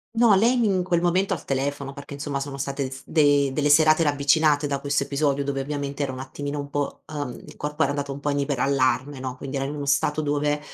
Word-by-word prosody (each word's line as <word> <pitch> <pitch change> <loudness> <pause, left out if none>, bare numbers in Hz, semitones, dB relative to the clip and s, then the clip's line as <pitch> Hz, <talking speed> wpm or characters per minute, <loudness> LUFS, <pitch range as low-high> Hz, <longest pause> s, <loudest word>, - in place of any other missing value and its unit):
No, 230 -2 +5
lei 235 +6 +3
mi 235 - +2
in 185 -2 +1
quel 175 -2 +1
momento 185 +3 +2
al 145 - -11
telefono, 140 +1 -2
perché 140 +1 -9
insomma 140 -1 -3
sono 140 0 -5
state 140 -1 -3
s 130 0 -9
de 145 -3 +3
delle 145 0 +1
serate 155 +2 +6
ravvicinate 145 0 +3
da 140 -1 -1
questo 140 0 0
episodio 140 0 0
dove 140 -1 -2
ovviamente 140 0 -4
era 140 - -1
un 130 - -7
attimino 145 +2 -5
un 140 0 -5
po', 145 -1 -3
uhm 145 -4 -4
il - - -13
corpo 150 0 -1
era 140 - +1
andato 140 -1 -3
un 140 - -8
po' 145 +1 -1
in 140 - 0
iperallarme, 135 0 0
no, 130 -1 -4
quindi 135 +1 -5
era 135 - -1
in 145 +2 -4
uno 145 -1 -4
stato 150 +2 +1
dove, 145 0 0
145 Hz, 240 wpm, -24 LUFS, 140-150 Hz, -, serate